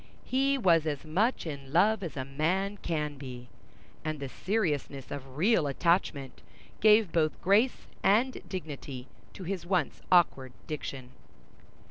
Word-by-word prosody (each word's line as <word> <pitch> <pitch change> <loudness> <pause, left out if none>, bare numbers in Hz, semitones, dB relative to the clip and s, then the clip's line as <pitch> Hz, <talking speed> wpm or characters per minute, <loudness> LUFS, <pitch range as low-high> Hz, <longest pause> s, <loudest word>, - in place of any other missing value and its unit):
He 275 +2 +2
was 170 - +3
as 145 0 -3
much 200 +11 +1
in 140 -4 -6
love 205 +7 +4
as 165 -7 -6
a 130 - -3
man 180 +9 -1
can 150 -6 -3
be, 125 -3 -8 0.5
and 155 -1 -3
the 140 -1 -5
seriousness 150 - -2
of 135 -1 -7
real 180 -2 +3
attachment 140 -2 0 0.4
gave 215 -4 +5
both 155 -2 +1
grace 210 +7 +2 0.2
and 235 +6 +3
dignity 145 -7 -6 0.3
to 190 - -9
his 185 -1 -3
once 175 -3 -1
awkward 140 -8 +3
diction. 135 -4 -6
160 Hz, 135 wpm, -29 LUFS, 140-195 Hz, 0.5 s, gave